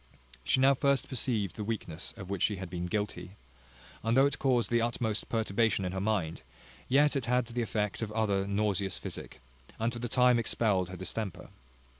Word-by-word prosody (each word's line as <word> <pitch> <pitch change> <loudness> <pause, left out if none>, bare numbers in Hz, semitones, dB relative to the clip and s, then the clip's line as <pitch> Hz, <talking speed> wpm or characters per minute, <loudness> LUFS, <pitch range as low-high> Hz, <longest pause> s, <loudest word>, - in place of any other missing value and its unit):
She 130 - +3
now 135 +1 +6
first 140 0 +1
perceived 115 - 0
the 105 - -4
weakness 100 -6 -3
of 95 - -8
which 100 -2 -3
she 105 - +2
had 95 -2 -7
been 90 0 -3
guilty; 95 -2 -3 0.7
and 115 +2 +1
though 135 - +7
it 140 - 0
caused 125 -4 +2
the 120 0 +3
utmost 115 -2 -1
perturbation 110 -2 +1
in 90 - -2
her 95 0 -3
mind, 95 -8 -1 0.5
yet 145 +3 +4
it 135 -4 -1
had 125 +1 +2
the 120 +1 -3
effect 105 -2 -2
of 110 -2 -3
other 100 -3 +1
nauseous 100 -2 0
physic, - - -7 0.4
and 115 +2 0
for 120 - -5
the 120 0 -3
time 125 0 +4
expelled 105 -5 +1
her 95 - -7
distemper. 95 +1 -4
110 Hz, 190 wpm, -30 LUFS, 95-120 Hz, 0.7 s, though